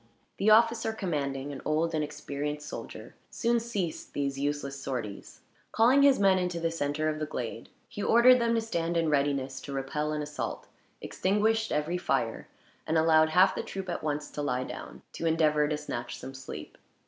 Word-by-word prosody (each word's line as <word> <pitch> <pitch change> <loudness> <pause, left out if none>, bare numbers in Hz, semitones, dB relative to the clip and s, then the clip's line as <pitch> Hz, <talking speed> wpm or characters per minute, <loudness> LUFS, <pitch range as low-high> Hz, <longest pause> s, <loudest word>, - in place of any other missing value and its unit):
The 200 - +2
officer 225 0 +4
commanding, 145 -8 -3
an 135 - -7
old 160 +2 0
and 155 -1 +1
experienced 150 0 -5
soldier, - - -8 0.2
soon 235 0 +1
ceased 205 -8 -4
these 140 -1 -1
useless 140 -1 -2
sorties. 125 -7 -5 0.3
Calling 245 +5 +5
his 280 -1 +6
men 195 -2 +4
into 180 -1 -2
the 165 0 0
center 155 -1 -1
of 155 0 -1
the 155 - -2
glade; 115 -4 -5 0.2
he 205 - -7
ordered 245 +4 +6
them 230 0 +2
to 230 - +2
stand 170 -6 -1
in 165 -1 +2
readiness 140 -2 0
to 140 - -7
repel 145 +3 -2
an 150 -1 -2
assault, 150 0 -5 0.4
extinguished 220 +3 +1
every 155 +4 0
fire, 120 -8 -1 0.4
and 160 - +2
allowed 160 0 +5
half 185 +4 +5
the - - -3
troop 190 -1 -6
at - - -3
once 150 -1 -3
to 150 - -4
lie 130 -3 -1
down, - - -9
to 165 - -2
endeavor 155 -2 +3
to 150 0 -1
snatch 120 -5 -5
some 130 +2 -8
sleep. 130 0 -9
155 Hz, 185 wpm, -29 LUFS, 140-190 Hz, 0.4 s, his